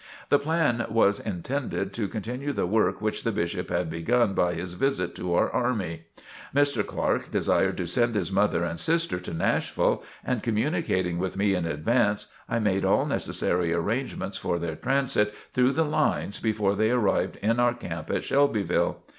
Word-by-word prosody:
The 145 Hz, -, +5 dB
plan 145 Hz, -6 st, +1 dB
was 105 Hz, -2 st, +3 dB
intended 105 Hz, 0 st, -3 dB
to 105 Hz, -1 st, -2 dB
continue 125 Hz, +8 st, -4 dB
the -, -, 0 dB
work 95 Hz, -1 st, +1 dB
which 110 Hz, 0 st, -2 dB
the 115 Hz, -, +1 dB
Bishop 90 Hz, -2 st, -2 dB
had 85 Hz, 0 st, 0 dB
begun 95 Hz, +7 st, +1 dB
by 90 Hz, -2 st, +1 dB
his 90 Hz, +1 st, -5 dB
visit 95 Hz, -2 st, 0 dB
to 90 Hz, -1 st, -1 dB
our -, -, +2 dB
army. 90 Hz, -9 st, -1 dB, 0.5 s
Mr. 140 Hz, -6 st, +3 dB
Clark -, -, -1 dB
desired -, -, +1 dB
to 90 Hz, -, -2 dB
send 120 Hz, +7 st, +1 dB
his 105 Hz, -, -1 dB
mother 95 Hz, -3 st, +2 dB
and 85 Hz, -1 st, -3 dB
sister 165 Hz, -, 0 dB
to 90 Hz, -, -7 dB
Nashville, 80 Hz, -, +1 dB, 0.2 s
and 125 Hz, -4 st, 0 dB
communicating 105 Hz, -, 0 dB
with 95 Hz, +1 st, -3 dB
me 100 Hz, 0 st, +2 dB
in 90 Hz, -3 st, -1 dB
advance, 105 Hz, +7 st, +1 dB, 0.2 s
I 115 Hz, -, 0 dB
made 100 Hz, -4 st, +1 dB
all -, -, +3 dB
necessary 85 Hz, -1 st, -1 dB
arrangements 115 Hz, +10 st, -2 dB
for 85 Hz, -, -1 dB
their 85 Hz, -2 st, -3 dB
transit 125 Hz, -, +1 dB, 0.2 s
through 125 Hz, +1 st, +3 dB
the 160 Hz, +3 st, +2 dB
lines 150 Hz, -8 st, 0 dB
before 105 Hz, -3 st, +1 dB
they 110 Hz, +2 st, +2 dB
arrived 120 Hz, -5 st, +1 dB
in 115 Hz, +3 st, +2 dB
our 120 Hz, 0 st, +3 dB
camp 85 Hz, -9 st, -6 dB
at -, -, -1 dB
Shelbyville. 135 Hz, -10 st, +1 dB
105 Hz, 170 wpm, -26 LUFS, 90-125 Hz, 0.5 s, The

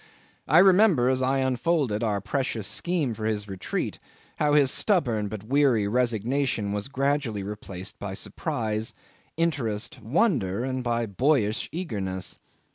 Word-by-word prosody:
I 155 Hz, -, +5 dB
remember, 185 Hz, -, +6 dB
as 130 Hz, 0 st, +1 dB
I 135 Hz, +1 st, +2 dB
unfolded 130 Hz, -3 st, +1 dB
our 105 Hz, -3 st, 0 dB
precious 115 Hz, 0 st, -2 dB
scheme 165 Hz, -, 0 dB
for 110 Hz, 0 st, -5 dB
his 105 Hz, -2 st, -1 dB
retreat, 95 Hz, -2 st, -4 dB, 0.4 s
how 150 Hz, -1 st, +2 dB
his 140 Hz, -3 st, +5 dB
stubborn 120 Hz, -, +1 dB
but 100 Hz, -1 st, -6 dB
weary 125 Hz, -4 st, +3 dB
resignation 120 Hz, -1 st, 0 dB
was 105 Hz, 0 st, -2 dB
gradually 135 Hz, -6 st, -1 dB
replaced 95 Hz, -2 st, -7 dB
by -, -, -5 dB
surprise, 110 Hz, 0 st, -3 dB, 0.4 s
interest, 135 Hz, -11 st, -1 dB
wonder, 120 Hz, -, +1 dB
and 130 Hz, -1 st, -2 dB
by 120 Hz, -1 st, 0 dB
boyish 110 Hz, 0 st, +1 dB
eagerness. 100 Hz, -, -4 dB
120 Hz, 130 wpm, -26 LUFS, 105-140 Hz, 0.4 s, remember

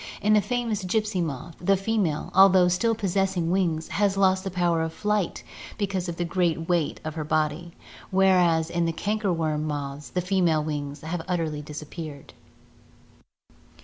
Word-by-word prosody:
In 210 Hz, +1 st, +2 dB
the 210 Hz, -, +5 dB
famous 225 Hz, -1 st, -2 dB
gypsy 210 Hz, 0 st, 0 dB
moth, 160 Hz, 0 st, -5 dB
the 195 Hz, +2 st, +3 dB
female, 195 Hz, -6 st, -1 dB
although 190 Hz, -1 st, +6 dB
still 225 Hz, +6 st, +1 dB
possessing 190 Hz, -4 st, 0 dB
wings, 170 Hz, -4 st, 0 dB
has 200 Hz, -1 st, +1 dB
lost 190 Hz, -1 st, +3 dB
the 195 Hz, -, -3 dB
power 175 Hz, -2 st, +1 dB
of 160 Hz, 0 st, -2 dB
flight 210 Hz, -2 st, -1 dB, 0.3 s
because 190 Hz, -3 st, -2 dB
of 170 Hz, -, -5 dB
the 175 Hz, -, -1 dB
great 170 Hz, -2 st, 0 dB
weight 170 Hz, -4 st, 0 dB
of 155 Hz, 0 st, -4 dB
her 155 Hz, -1 st, -4 dB
body, 155 Hz, +2 st, -1 dB, 0.4 s
whereas 180 Hz, -4 st, +3 dB
in 170 Hz, 0 st, 0 dB
the 165 Hz, -, 0 dB
canker 210 Hz, +2 st, -1 dB
worm 155 Hz, -3 st, -1 dB
moths 145 Hz, -1 st, -4 dB
the 180 Hz, -, -1 dB
female 175 Hz, -4 st, +2 dB
wings 145 Hz, -2 st, -4 dB
have 160 Hz, +2 st, -4 dB
utterly 165 Hz, -5 st, -1 dB
disappeared. 150 Hz, 0 st, -8 dB
175 Hz, 160 wpm, -25 LUFS, 160-195 Hz, 0.4 s, although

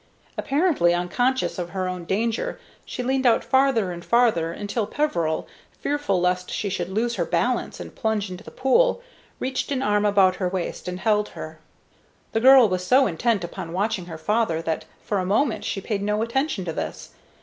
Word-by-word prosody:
Apparently 280 Hz, -, +2 dB
unconscious 245 Hz, +7 st, 0 dB
of 175 Hz, -1 st, -3 dB
her 185 Hz, 0 st, -2 dB
own 180 Hz, -1 st, -5 dB
danger, 225 Hz, +5 st, -1 dB, 0.3 s
she 250 Hz, -, -5 dB
leaned 260 Hz, +1 st, +1 dB
out 230 Hz, -, +4 dB
farther 265 Hz, -8 st, +2 dB
and 175 Hz, -1 st, -7 dB
farther, 225 Hz, -9 st, +2 dB
until 205 Hz, +4 st, -3 dB
Peveril, 170 Hz, -, -1 dB, 0.3 s
fearful 290 Hz, -11 st, 0 dB
lest 180 Hz, 0 st, 0 dB
she 205 Hz, -, -2 dB
should 180 Hz, -2 st, -3 dB
lose 230 Hz, +4 st, -1 dB
her -, -, +1 dB
balance -, -, -1 dB
and -, -, -8 dB
plunge 215 Hz, -3 st, -1 dB
into 180 Hz, -, -8 dB
the -, -, -10 dB
pool, 485 Hz, -, +2 dB, 0.4 s
reached 260 Hz, +2 st, -2 dB
an 270 Hz, -1 st, 0 dB
arm 210 Hz, -2 st, +2 dB
about 195 Hz, -3 st, +4 dB
her 180 Hz, -1 st, -1 dB
waist 185 Hz, -1 st, -4 dB
and 180 Hz, +1 st, -4 dB
held 210 Hz, -1 st, +2 dB
her. 155 Hz, 0 st, -9 dB, 0.7 s
The 225 Hz, -, +1 dB
girl 260 Hz, -1 st, +8 dB
was 185 Hz, -2 st, -2 dB
so 260 Hz, +8 st, +5 dB
intent 205 Hz, +2 st, 0 dB
upon 170 Hz, -1 st, -6 dB
watching 195 Hz, -1 st, -1 dB
her 165 Hz, -2 st, -7 dB
father 210 Hz, 0 st, 0 dB
that 160 Hz, -1 st, -2 dB, 0.2 s
for 205 Hz, -, -1 dB
a -, -, -1 dB
moment 215 Hz, +7 st, +1 dB
she -, -, -2 dB
paid 200 Hz, 0 st, -3 dB
no 210 Hz, +2 st, 0 dB
attention 235 Hz, -, -1 dB
to 165 Hz, -, -3 dB
this. -, -, -5 dB
205 Hz, 185 wpm, -24 LUFS, 180-245 Hz, 0.7 s, girl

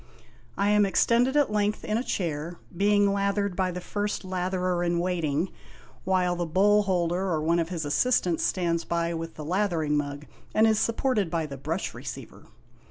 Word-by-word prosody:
I 200 Hz, +1 st, +2 dB
am 210 Hz, 0 st, +5 dB
extended 240 Hz, +7 st, +3 dB
at 290 Hz, -6 st, +3 dB
length 210 Hz, 0 st, 0 dB
in 215 Hz, -, -1 dB
a 235 Hz, -, 0 dB
chair, 165 Hz, -, -3 dB, 0.2 s
being 205 Hz, +1 st, +3 dB
lathered 200 Hz, -1 st, 0 dB
by 185 Hz, -1 st, 0 dB
the 180 Hz, 0 st, -4 dB
First 205 Hz, +3 st, -3 dB
Latherer 185 Hz, -1 st, -1 dB
in 170 Hz, 0 st, +1 dB
Waiting, 170 Hz, -2 st, -1 dB, 0.5 s
while 180 Hz, -1 st, +2 dB
the 175 Hz, -, -2 dB
Bowl 205 Hz, +5 st, +4 dB
holder 185 Hz, -1 st, 0 dB
or 160 Hz, -3 st, 0 dB
one 170 Hz, +2 st, +2 dB
of 165 Hz, 0 st, -1 dB
his 170 Hz, -4 st, -3 dB
assistants 175 Hz, -, +1 dB
stands 170 Hz, -2 st, 0 dB
by 170 Hz, 0 st, -1 dB
with 165 Hz, 0 st, -5 dB
the 155 Hz, -, -7 dB
lathering 170 Hz, -4 st, 0 dB
mug, 145 Hz, 0 st, -3 dB, 0.3 s
and 220 Hz, -, +5 dB
is 220 Hz, -1 st, +3 dB
supported 230 Hz, -5 st, +1 dB
by 165 Hz, -1 st, -1 dB
the 140 Hz, -2 st, -7 dB
Brush 155 Hz, +7 st, -3 dB
THE -, -, -9 dB
SHAVING -, -, -6 dB
OF -, -, -16 dB
MUDJAHOY. -, -, -15 dB
Receiver. -, -, -22 dB
180 Hz, 195 wpm, -27 LUFS, 165-205 Hz, 0.5 s, am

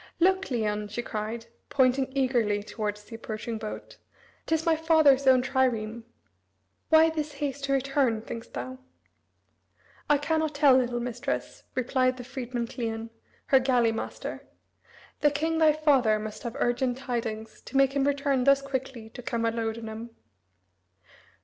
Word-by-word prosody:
"Look, 375 Hz, +2 st, +4 dB
Cleon," 210 Hz, -4 st, -1 dB
she 210 Hz, +4 st, -4 dB
cried, 220 Hz, +1 st, -4 dB, 0.2 s
pointing, 260 Hz, 0 st, +2 dB
eagerly 235 Hz, -6 st, +1 dB
towards 210 Hz, -1 st, -4 dB
the 225 Hz, -, -14 dB
approaching 225 Hz, 0 st, -5 dB
boat, 215 Hz, -1 st, -7 dB, 0.5 s
"'t 320 Hz, -, +3 dB
is 320 Hz, -, -2 dB
my 330 Hz, -1 st, +4 dB
father's 310 Hz, -4 st, +4 dB
own 255 Hz, -1 st, +6 dB
trireme. 235 Hz, -4 st, 0 dB, 0.8 s
Why 320 Hz, 0 st, +6 dB
this 305 Hz, -2 st, -3 dB
haste 280 Hz, -1 st, -3 dB
to 275 Hz, -, 0 dB
return, 270 Hz, -4 st, +1 dB
think'st 230 Hz, 0 st, -8 dB
thou?" 260 Hz, 0 st, -5 dB, 1.3 s
"I 295 Hz, -, +5 dB
cannot 315 Hz, +1 st, -1 dB
tell, 285 Hz, -2 st, +6 dB
little 245 Hz, -2 st, +1 dB
mistress," 245 Hz, 0 st, -4 dB
replied 255 Hz, 0 st, +1 dB
the 250 Hz, -, -7 dB
freedman 245 Hz, -1 st, -4 dB
Cleon, 225 Hz, -1 st, -4 dB, 0.3 s
her 265 Hz, -, +5 dB
galley 250 Hz, -3 st, +3 dB
master; 225 Hz, -, -6 dB, 0.7 s
"the 295 Hz, -, +4 dB
king 320 Hz, +3 st, -1 dB
thy 315 Hz, -1 st, +6 dB
father 275 Hz, -8 st, +3 dB
must 215 Hz, 0 st, -6 dB
have 235 Hz, -2 st, -5 dB
urgent 245 Hz, +1 st, 0 dB
tidings, 225 Hz, -4 st, -4 dB
to 270 Hz, -, -4 dB
make 275 Hz, 0 st, +4 dB
him 275 Hz, -1 st, +2 dB
return 280 Hz, -2 st, +1 dB
thus 275 Hz, 0 st, +5 dB
quickly 260 Hz, -4 st, -5 dB
to 245 Hz, -, -9 dB
Camalodunum." 230 Hz, -1 st, -3 dB
255 Hz, 145 wpm, -27 LUFS, 230-275 Hz, 1.3 s, own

